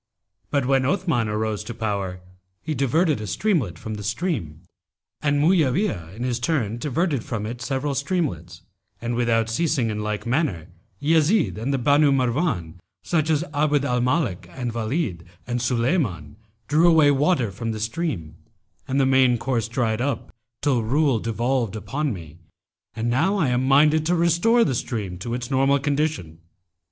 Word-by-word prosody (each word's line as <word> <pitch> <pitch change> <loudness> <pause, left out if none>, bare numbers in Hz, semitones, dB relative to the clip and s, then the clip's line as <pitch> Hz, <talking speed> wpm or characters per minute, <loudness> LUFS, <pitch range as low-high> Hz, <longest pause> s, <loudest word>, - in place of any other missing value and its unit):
But 140 -3 +1
when 135 0 +2
Othman 155 - 0
arose 105 0 -2
to 120 - -6
power 100 -5 -3 0.4
he 155 - -2
diverted 145 0 +1
a 105 - -5
streamlet 135 - 0
from 110 +5 -6
the 105 -1 -6
stream, 105 - -3 0.6
and 145 -1 +1
Mu'awiyah 150 - +1
in 120 - -5
his 125 -1 -1
turn 120 -5 -1
diverted 145 -1 -1
from 105 -3 -4
it 120 +2 -6
several 135 +2 -2
streamlets; 140 - -2 0.4
and 120 +1 -3
without 115 -2 +1
ceasing 125 -1 0
in 105 0 -3
like 105 0 -3
manner, 120 - -1 0.3
Yezid 160 - +2
and 125 +5 -2
the 135 - +1
Banu 145 +3 +4
Marwán 125 - 0 0.2
such 160 -2 0
as 155 0 +2
Abd 145 -1 +2
al 125 -2 +1
Malik 125 - 0
and 125 -3 -4
Walíd 115 - -2 0.2
and 120 0 -2
Sulaymán[FN#288] 115 - 0 0.3
drew 160 +4 +4
away 155 -3 +5
water 140 - +2
from 115 +4 -4
the 110 - -4
stream, 110 - -3 0.5
and 135 +1 0
the 135 - +4
main 130 -2 +4
course 115 -3 -1
dried 115 -1 -1
up, 135 -1 -3 0.3
till 135 -5 +2
rule 135 +2 +2
devolved 115 0 -1
upon 135 +8 -2
me, 85 -6 -8 0.6
and 115 +1 -2
now 165 +12 +2
I 155 -9 +2
am 125 +1 +1
minded 150 +3 +4
to 175 - +2
restore 170 +8 +3
the 140 - 0
stream 105 -7 -4
to 115 +5 -3
its 125 +1 -5
normal 135 +1 +3
condition.' 140 - -2
125 Hz, 165 wpm, -23 LUFS, 110-150 Hz, 0.6 s, away